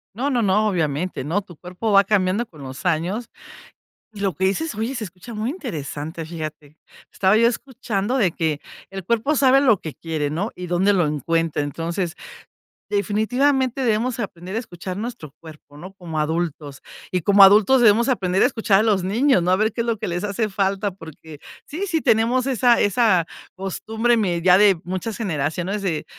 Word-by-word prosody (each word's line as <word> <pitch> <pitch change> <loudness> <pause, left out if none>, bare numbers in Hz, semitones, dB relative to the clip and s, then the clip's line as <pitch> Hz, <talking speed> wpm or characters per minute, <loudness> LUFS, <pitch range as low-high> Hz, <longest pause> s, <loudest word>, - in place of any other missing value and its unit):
No, 265 +6 -1
no, 250 -4 +1
no, 210 +1 +2
obviamente. 165 -4 -2
No, 165 +9 -1
tu 185 -3 -15
cuerpo 185 +6 -4
va 200 0 +6
cambiando 195 +2 +1
con 155 -9 -14
los 130 +3 -9
años, 180 +7 -1 0.8
y 210 - -11
lo 195 -2 0
que 190 - -4
dices, 225 +8 -1
oye, 225 +5 -2
se 230 -5 -4
escucha 190 +6 -11
muy 215 +2 -2
interesante, 160 - -6
fíjate. 155 -2 -8 0.3
Estaba 195 +2 +3
yo 230 +1 +5
escuchando 240 -2 -2
de 195 -9 +2
que, 155 -3 -1 0.3
el 195 -1 -7
cuerpo 235 +8 +1
sabe 270 -1 +5
lo 230 -9 +4
que 155 - -7
quiere, 155 -3 -3
¿no? 180 +9 -3
Y 180 0 -7
dónde 180 +3 +2
lo 175 -5 +2
encuentra. 160 +2 -1
Entonces, 170 +4 -3 0.7
definitivamente 250 +6 0
debemos 235 +1 0
aprender 185 -3 -6
a - - 0
escuchar 185 -5 -7
nuestro 215 - -6
cuerpo, 155 -3 -14
¿no?, 180 +6 -10
como 170 -5 -6
adultos. 150 -3 -3 0.3
Y 180 - 0
como 200 +4 +4
adultos 210 +6 +6
debemos 230 +1 +5
aprender 190 -6 +1
a - - +6
escuchar 205 -3 +2
a - - +1
los 205 -5 +1
niños, 225 +3 +2
¿no? 175 - -1
A 185 - +5
ver 215 +2 0
qué - - -2
es 235 - -4
lo 230 -1 0
que - - -4
les 175 +1 -3
hace 210 +2 -1
falta, 195 +1 -1
porque 160 -4 -12 0.3
sí, 365 +7 -5
sí 330 -3 0
tenemos 235 +3 +2
esa 245 -2 +3
esa 205 -4 +3 0.3
costumbre 220 +5 -1
me 180 -6 0
ya 185 +1 +6
de 200 -4 +5
muchas 190 +5 -4
generaciones, 180 +1 -2
de: 170 -6 -2
195 Hz, 190 wpm, -22 LUFS, 170-225 Hz, 0.8 s, va